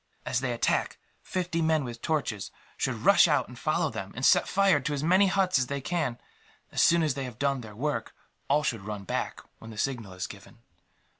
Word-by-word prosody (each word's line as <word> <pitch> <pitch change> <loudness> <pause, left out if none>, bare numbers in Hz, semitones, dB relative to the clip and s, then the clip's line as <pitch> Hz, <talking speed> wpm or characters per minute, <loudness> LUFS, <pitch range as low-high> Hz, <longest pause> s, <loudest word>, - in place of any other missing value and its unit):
"As 125 - 0
they 130 -2 -1
attack, 120 - 0 0.2
fifty 180 -2 -2
men 160 -2 +2
with 120 -2 -7
torches 140 -10 -2 0.3
should - - -2
rush - - +7
out - - +2
and - - -11
follow - - 0
them, - - -6
and - - -1
set - - +5
fire 195 -5 +3
to 145 +2 -2
as 140 - -3
many 185 +5 +5
huts 185 -5 +2
as 125 - 0
they 140 +1 -3
can. 150 -4 -2 0.5
As - - +1
soon 170 0 +5
as 155 -3 +1
they 135 0 -4
had 125 -3 -8
done 140 -1 0
their 110 -3 -10
work, 145 +6 -3 0.3
all 150 +2 +3
should 115 -7 -1
run 105 0 -6
back, - - -3 0.2
when 110 - -11
the 110 - -10
signal 115 -6 -2
is 95 -1 -4
given. 100 +1 -12
135 Hz, 215 wpm, -28 LUFS, 115-160 Hz, 0.5 s, rush